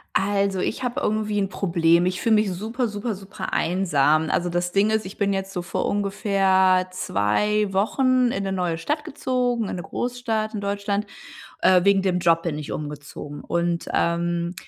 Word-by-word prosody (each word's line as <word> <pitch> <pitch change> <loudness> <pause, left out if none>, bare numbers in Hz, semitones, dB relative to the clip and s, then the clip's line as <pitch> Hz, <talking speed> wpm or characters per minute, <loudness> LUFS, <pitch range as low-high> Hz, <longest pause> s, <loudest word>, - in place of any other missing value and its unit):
Also 200 -1 +1
ich 220 - -2
habe 245 -1 -2
irgendwie 215 -1 0
'n 195 -1 0
Problem. 170 -2 +2
Ich 185 0 -1
fühle 225 -1 +3
mich 210 -2 +2
super 225 +7 -2
super 210 +1 -3
super 195 0 -6
einsam. 160 -3 +2
Also, 175 0 0
das 175 0 -1
Ding 200 +2 +3
ist, 220 -2 0
ich 185 - -9
bin 200 -1 +1
jetzt 195 0 -3
so 180 - -2
vor 175 - -2
ungefähr 195 -2 +2
2 195 - 0
Wochen 255 +5 +2
in 195 - -2
'ne 195 - -2
neue 180 -3 -1
Stadt 295 - -2
gezogen, 245 -5 -1
in - - -3
'ne 175 - -5
Großstadt 230 0 -2
in 210 - -4
Deutschland. 200 +1 -2 0.5
Äh, 180 -1 +5
wegen 200 -1 +5
dem 185 -2 0
Job 165 -1 +3
bin 160 -3 -3
ich 150 - -6
umgezogen 145 -1 -7
und, 170 0 -1
ähm, 170 +1 0
195 Hz, 180 wpm, -23 LUFS, 175-210 Hz, 0.5 s, Äh